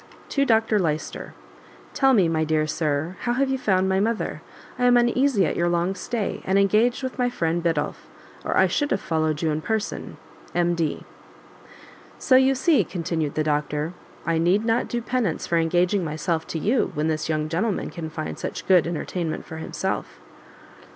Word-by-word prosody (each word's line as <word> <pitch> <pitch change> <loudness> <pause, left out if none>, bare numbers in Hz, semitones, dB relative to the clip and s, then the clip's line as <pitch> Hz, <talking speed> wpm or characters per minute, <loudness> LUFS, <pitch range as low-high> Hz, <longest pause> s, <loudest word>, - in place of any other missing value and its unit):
To 280 -1 +1
Dr 225 -3 +3
Lyster. 155 -4 -3 0.6
Tell 270 -1 +4
me, 190 -6 +4
my 160 -1 +1
dear 155 0 +1
Sir, 155 +2 -2
how 240 - -1
you 270 +3 +2
have 265 -1 -1
found 190 -2 +2
my 190 0 +2
mother? 220 +2 -1 0.4
I 250 - +2
am 245 0 +6
uneasy 240 -3 +3
at - - -1
your 175 0 +1
long 175 +2 +1
stay, 220 +2 -3
and 190 +1 +1
engaged 215 +6 +3
with 260 0 -5
my 245 0 +2
friend 170 -7 -1
Biddulph, 165 -3 -2 0.4
or - - -1
I - - +6
should 290 -1 0
have 195 - +1
followed 160 -2 -1
you 160 - +2
in 150 +1 -2
person. 220 +4 -3 0.4
M.D. 170 -3 0 1.1
"So 260 - +3
you 265 +1 +5
see," 295 +4 +3
continued 165 -4 -3
the 155 - +1
doctor, 150 +1 -1 0.3
"I 165 0 +1
need 185 +6 +2
not 230 +1 +1
do 240 -1 -3
penance 235 -9 -1
for 170 - +1
engaging 175 +4 +2
myself 160 +1 -2
to - - -4
you, 220 - +1
when 150 +2 0
this 155 0 -1
young 155 -1 0
gentleman 185 +6 -1
can 165 -2 -6
find 155 0 -5
such - - -5
good 180 -3 +5
entertainment 170 0 -3
for 160 - -8
himself." 160 - -4
175 Hz, 180 wpm, -24 LUFS, 160-230 Hz, 1.1 s, am